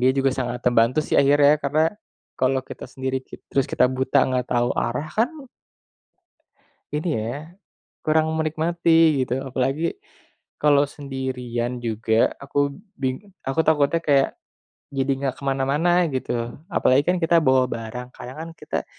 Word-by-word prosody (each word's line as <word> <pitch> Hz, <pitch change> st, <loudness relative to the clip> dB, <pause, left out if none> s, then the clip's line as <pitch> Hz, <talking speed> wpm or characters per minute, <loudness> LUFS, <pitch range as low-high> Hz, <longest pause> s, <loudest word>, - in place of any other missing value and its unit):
dia 125 Hz, -, +4 dB
juga 135 Hz, 0 st, +3 dB
sangat 125 Hz, -2 st, -3 dB
terbantu 120 Hz, +2 st, +3 dB
sih -, -, 0 dB
akhirnya. 145 Hz, +1 st, +5 dB
Karena 150 Hz, +3 st, +2 dB, 0.5 s
kalau 130 Hz, +1 st, +2 dB
kita -, -, -9 dB
sendiri 130 Hz, 0 st, -3 dB
kit -, -, -12 dB
terus 135 Hz, -2 st, +2 dB
kita -, -, +3 dB
buta 130 Hz, 0 st, +2 dB
nggak 125 Hz, -1 st, -1 dB
tahu 120 Hz, 0 st, +1 dB
arah 125 Hz, +6 st, -2 dB
kan 225 Hz, +5 st, +2 dB, 1.6 s
ini 150 Hz, +4 st, -2 dB
ya 140 Hz, +10 st, -5 dB, 0.5 s
kurang 160 Hz, 0 st, +2 dB
menikmati, 160 Hz, -2 st, +2 dB
gitu. 125 Hz, +1 st, -2 dB
Apalagi, 135 Hz, +5 st, -1 dB, 0.6 s
kalau 145 Hz, -1 st, +4 dB
sendirian 125 Hz, -4 st, -4 dB
juga 110 Hz, 0 st, +1 dB
aku 140 Hz, 0 st, 0 dB, 0.2 s
bing 130 Hz, -1 st, -2 dB, 0.3 s
aku 135 Hz, +4 st, -1 dB
takutnya 155 Hz, +1 st, +3 dB
kayak 140 Hz, -3 st, +3 dB, 0.6 s
jadi 135 Hz, 0 st, 0 dB
nggak 135 Hz, -2 st, -2 dB
ke -, -, -13 dB
mana-mana 145 Hz, +7 st, +2 dB
gitu. 130 Hz, -, -2 dB, 0.4 s
Apalagi 135 Hz, -3 st, +3 dB
kan 185 Hz, -, 0 dB
kita 165 Hz, +1 st, +4 dB
bawa 130 Hz, -1 st, +4 dB
barang, 125 Hz, +2 st, -6 dB
kadang 130 Hz, +4 st, -9 dB
kan 165 Hz, -, -7 dB
kita, -, -, -4 dB
135 Hz, 140 wpm, -23 LUFS, 125-155 Hz, 1.6 s, akhirnya